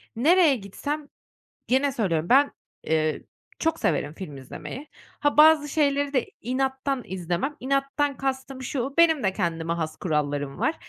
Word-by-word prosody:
nereye 310 +4 +5
gitsem, 285 +9 -5 0.6
gene 265 +3 +2
söylüyorum 175 -9 -1
ben, 280 +3 +5 0.3
eee, 155 -1 0 0.4
çok 325 0 0
severim 145 - 0
film 155 -5 -8
izlemeyi. 255 - -8 0.3
Ha, 290 0 +1
bazı 305 -1 +7
şeyleri 285 -1 +1
de 255 -4 +2 0.2
inattan 265 +2 -1
izlemem. 185 - -3
İnattan 275 +2 0
kastım 265 0 -3
şu, 265 +1 -3
benim 320 -4 +5
de 190 -2 +1
kendime 165 -3 -1
has 160 -2 -4
kurallarım 145 -4 -2
var. 320 - +1
265 Hz, 140 wpm, -25 LUFS, 175-285 Hz, 0.6 s, bazı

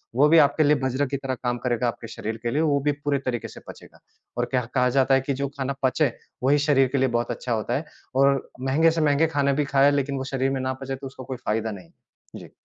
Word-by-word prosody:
वो 140 +4 +5
भी 165 - +6
आपके 145 +1 +4
लिए 150 0 +4
वज्र 130 +2 0
की 140 +2 -3
तरह 135 -1 -3
काम 120 0 -2
करेगा 120 -1 +1
आपके 115 -1 -5
शरीर 110 0 -5
के 120 - -1
लिए, 150 - +1
वो 145 -3 +2
भी 145 +2 +1
पूरे 145 -1 -2
तरीके 120 -2 -2
से - - -12
पचेगा - - -13 0.4
और - - +1
क्या 125 -2 0
कहा 125 -1 +3
जाता 135 +1 +2
है 135 - +2
कि 140 +1 -2
जो 140 +1 -2
खाना 135 0 -2
पचे, 135 +1 +2 0.3
वही 140 +3 +4
शरीर 140 -2 +3
के - - +2
लिए 130 0 +3
बहुत 120 0 -2
अच्छा 125 - -5
होता 110 -1 -2
है 155 - -5 0.3
और 135 0 +2
महँगे 145 +5 +3
से 165 0 -1
महँगे 150 +1 +3
खाना 140 -3 +1
भी - - 0
खाया 140 0 +4
लेकिन 140 -1 -1
वो 130 - -3
शरीर 135 0 +1
में 135 -1 -2
ना 130 0 -1
पचे 135 0 -4
तो 135 +1 -8
उसका 130 0 -10
कोई 130 0 -6
फायदा 110 +1 -1
नहीं 95 -4 -10
है। - - -17
जी। - - -13
135 Hz, 265 wpm, -24 LUFS, 130-145 Hz, 0.4 s, भी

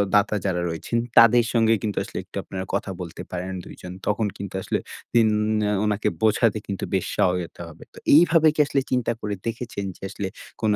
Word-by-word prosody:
দাতা 105 +1 +3
যারা 90 -3 0
রয়েছেন 85 +8 -2 0.2
তাদের 115 +1 +7
সঙ্গে 115 -1 +4
কিন্তু 105 -3 -2
আসলে - - -8
একটু - - -18
আপনারা 95 0 -5
কথা 95 - -2
বলতে 85 0 -7
পারেন 90 +1 -4
২ - - -10
জন। 90 0 -7
তখন 105 +1 +1
কিন্তু 100 -1 -6
আসলে - - -1 0.4
উন 110 -1 +4 0.5
ওনাকে 105 -1 +1
বোঝাতে 110 0 +3
কিন্তু 100 -1 -4
বেশ 95 - +1
সহায়তা 90 -2 0
হবে। 80 - -13
তো - - -17 0.2
এইভাবে 165 -1 +6 0.2
আসলে 140 - +1
চিন্তা 125 -2 +1
করে 105 -1 -2
দেখেছেন 115 -3 -4
যে - - -33
আসলে 100 0 -4 0.3
কোনো 110 -2 +3
105 Hz, 185 wpm, -24 LUFS, 95-115 Hz, 0.5 s, তাদের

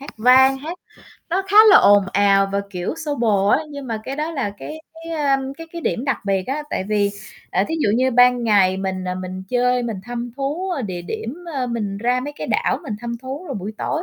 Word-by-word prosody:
hát 280 - -9
vang, 260 +4 +5
hát 325 +6 -7 0.5
nó 380 +3 +1
khá 405 - +1
là - - +9
ồn 205 -1 +6
ào, 195 -1 +4
và, 200 - +1
kiểu, 180 +4 -3
xô 295 -2 -1
bồ 205 -5 +2
á, - - +5
nhưng 280 -2 -7
mà 225 -3 -3
cái 270 - -5
đó 305 +2 -2
là, 270 -10 -2
cái 315 +1 -8 0.2
cái, 330 - -6
à, 285 -4 +1 0.2
cái 330 - -8
cái, 340 - -6
điểm 245 - -1
đặc 275 - 0
biệt 195 -2 0
á. 280 +3 -2
Tại 185 - -2
vì, 205 -1 +2 0.4
à, - - +1
thí 320 - -1
dụ - - +2
như 260 +2 +2
ban 245 0 +4
ngày 195 -4 +4
mình, 190 -1 -3
ờ, 180 0 -2
mình 185 0 -6
chơi, 250 +1 +1
mình 230 -3 -3
thăm 240 0 -5
thú, 300 +8 -2
ơ, 285 -7 -2
địa 185 -5 -5
điểm, 225 - -5 0.2
ờ, 260 -2 -1
mình 210 -5 -3
ra 245 +3 +1
mấy 290 +3 -5
cái - - -5
đảo - - 0
mình 215 - -5
thăm 235 0 -4
thú. 270 +6 -6
Rồi 275 - -5
buổi 205 0 -5
tối 315 - -2
245 Hz, 245 wpm, -21 LUFS, 200-275 Hz, 0.5 s, là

